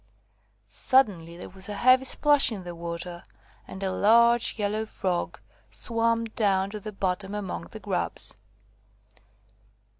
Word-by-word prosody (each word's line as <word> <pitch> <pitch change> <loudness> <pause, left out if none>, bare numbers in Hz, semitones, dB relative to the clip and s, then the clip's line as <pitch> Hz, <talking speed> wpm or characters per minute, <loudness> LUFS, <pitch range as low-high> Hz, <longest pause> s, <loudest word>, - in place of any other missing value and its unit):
Suddenly 185 -11 +1
there 175 - -8
was 190 +1 -9
a 205 - -4
heavy 255 +4 +4
splash 290 0 +5
in 200 -4 -6
the 175 -1 -7
water, 170 +1 -7 0.4
and 190 - -8
a 190 - -1
large 235 +4 +4
yellow 215 +1 -2
Frog 185 -4 -3 0.3
swam 230 0 -1
down 200 -3 0
to 210 - -6
the 215 +1 -7
bottom 195 0 -3
among 185 - -5
the 85 - -11
grubs. - - -4
205 Hz, 130 wpm, -26 LUFS, 180-230 Hz, 0.4 s, splash